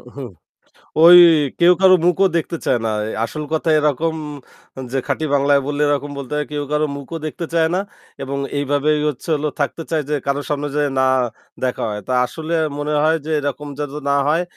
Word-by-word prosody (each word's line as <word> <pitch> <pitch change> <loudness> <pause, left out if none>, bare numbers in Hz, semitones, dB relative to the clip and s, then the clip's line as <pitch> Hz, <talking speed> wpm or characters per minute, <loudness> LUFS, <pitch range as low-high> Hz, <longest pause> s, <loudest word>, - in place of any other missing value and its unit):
হুম। 135 -3 -7 0.7
ওই 175 +1 +10 0.4
কেউ 175 +1 +6
কারো 190 -1 +7
মুখও 185 +2 +3
দেখতে 170 0 -3
চায় 125 - +2
না। 110 - 0
অ্যা 110 - -4
আসল 155 +6 -6
কথা 160 +1 0
এরকম 150 +2 0 0.8
যে 135 - -1
খাঁটি 160 - -1
বাংলায় 140 0 +3
বললে 145 0 -2
এরকম 145 0 -1
বলতে 135 0 -7
হয়, 150 - -1
কেউ 145 -1 -2
কারো 150 +1 +1
মুখও 140 +4 -7
দেখতে 170 +3 -5
চায় 165 -1 +3
না - - +1 0.4
এবং 140 +1 -4 0.2
এইভাবেই 145 +2 +1
হচ্ছে 145 +2 -7
হলো 150 +1 -2
থাকতে 150 +3 -2
চায় 155 -2 0
যে 150 - +1
কারো 140 +1 0
সামনে 145 0 -2
যেয়ে 145 -1 0
না 130 - +3 0.6
দেখা 125 -1 -1
হয়। 105 0 -4
তা 130 - -1
আসলে 160 +5 -6 0.2
মনে 145 +1 -2
হয় 160 +1 +3
যে 160 - -4
এরকম 145 +1 -4
যেন 145 -2 -3 0.2
না 140 - +3
হয়। 160 +4 +2
150 Hz, 195 wpm, -19 LUFS, 140-160 Hz, 0.8 s, ওই